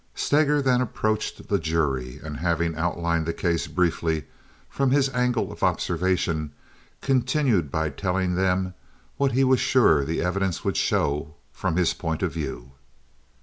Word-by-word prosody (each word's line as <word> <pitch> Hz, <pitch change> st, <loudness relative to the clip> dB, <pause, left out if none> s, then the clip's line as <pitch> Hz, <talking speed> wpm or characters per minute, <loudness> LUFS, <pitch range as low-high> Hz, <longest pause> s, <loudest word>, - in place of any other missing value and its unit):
Steger 150 Hz, -1 st, +2 dB
then 125 Hz, -2 st, +3 dB
approached 110 Hz, -3 st, -2 dB
the 100 Hz, -, +1 dB
jury, 75 Hz, -6 st, -1 dB
and, 75 Hz, -1 st, -6 dB
having 85 Hz, -1 st, 0 dB
outlined 85 Hz, 0 st, -1 dB
the 85 Hz, -, -1 dB
case 85 Hz, -1 st, -1 dB
briefly 80 Hz, -2 st, 0 dB, 0.4 s
from 135 Hz, -1 st, 0 dB
his 135 Hz, 0 st, +3 dB
angle 125 Hz, -2 st, 0 dB
of -, -, -11 dB
observation, 85 Hz, -4 st, 0 dB, 0.5 s
continued 130 Hz, -, +2 dB
by 80 Hz, +2 st, -1 dB
telling 95 Hz, +4 st, -1 dB
them 95 Hz, 0 st, 0 dB, 0.4 s
what 140 Hz, -2 st, +1 dB
he 135 Hz, +2 st, +3 dB
was 130 Hz, -1 st, +4 dB
sure 80 Hz, -, +4 dB
the 80 Hz, +4 st, -2 dB
evidence 95 Hz, 0 st, -1 dB
would -, -, 0 dB
show 75 Hz, +2 st, 0 dB, 0.2 s
from -, -, -2 dB
his 85 Hz, -2 st, +2 dB
point 80 Hz, -2 st, -3 dB
of -, -, -1 dB
view. 70 Hz, -5 st, -5 dB
90 Hz, 145 wpm, -25 LUFS, 80-120 Hz, 0.5 s, was